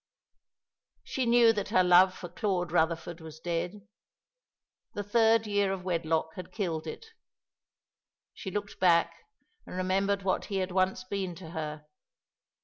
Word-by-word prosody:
She 255 -2 -2
knew 235 -1 +6
that 205 -2 -3
her 185 - +4
love 180 +1 +5
for 175 - -7
Claude 180 -2 -2
Rutherford 165 0 0
was 160 -1 -10
dead. 175 +5 -4 1.1
The 205 - -2
third 225 +2 +3
year 205 -2 +1
of 190 -1 -4
wedlock 165 -3 -1
had 185 - -9
killed 170 -7 -3
it. - - -7 1.3
She 195 - -7
looked 205 +1 -5
back 170 -2 +4 0.5
and - - -8
remembered 195 +2 0
what 185 -1 0
he 200 - -5
had 185 -1 -1
once 185 0 +1
been 185 -2 -4
to 165 -1 -10
her. 150 -2 -5
185 Hz, 140 wpm, -29 LUFS, 170-200 Hz, 1.3 s, knew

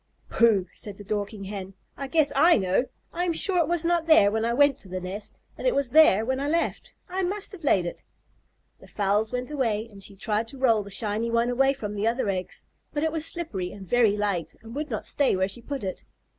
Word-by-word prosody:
"Pooh!" 220 -5 +3
said 205 -2 -7
the 205 - -10
Dorking 205 0 -3
Hen. 195 -1 -7 0.2
"I 275 - -5
guess 310 0 +2
I 330 +5 +6
know! 190 +4 +1 0.3
I 350 - -1
am 345 - 0
sure 360 +2 +2
it 330 - +2
was 345 -1 0
not 340 -1 +1
there 205 -11 +6
when 220 +1 -1
I 235 - +1
went 285 +2 +3
to 190 - -5
the 185 0 -3
nest 190 +3 -6 0.2
and - - -1
it - - +2
was 275 -3 0
there 270 -9 +6
when 260 +2 -1
I 280 - -2
left. 335 +2 -1 0.2
I 375 +1 -2
must 395 +3 -3
have 380 -5 -11
laid 195 -11 +3
it." 175 - -6 0.8
The - - -16
fowls 210 +2 0
went 250 +3 -4
away, 230 -6 -1
and 200 -1 -13
she 195 +1 -6
tried 215 +2 -1
to 270 - -7
roll 235 -5 +3
the 200 - -9
shiny 215 +3 -1
one 235 +1 +1
away 270 +2 +3
from 210 -7 -6
the 210 +2 -1
other 230 -2 0
eggs, 185 -2 -4 0.3
but 295 0 -2
it 320 - +1
was 320 0 +1
slippery 200 - -3
and 195 -2 -10
very 225 -1 +3
light 185 -6 -2
and 225 0 -10
would 300 +1 -3
not - - -3
stay 285 -7 +2
where 190 0 +1
she 200 +5 -6
put 275 +1 -5
it. 190 -1 -4
230 Hz, 240 wpm, -26 LUFS, 200-290 Hz, 0.8 s, I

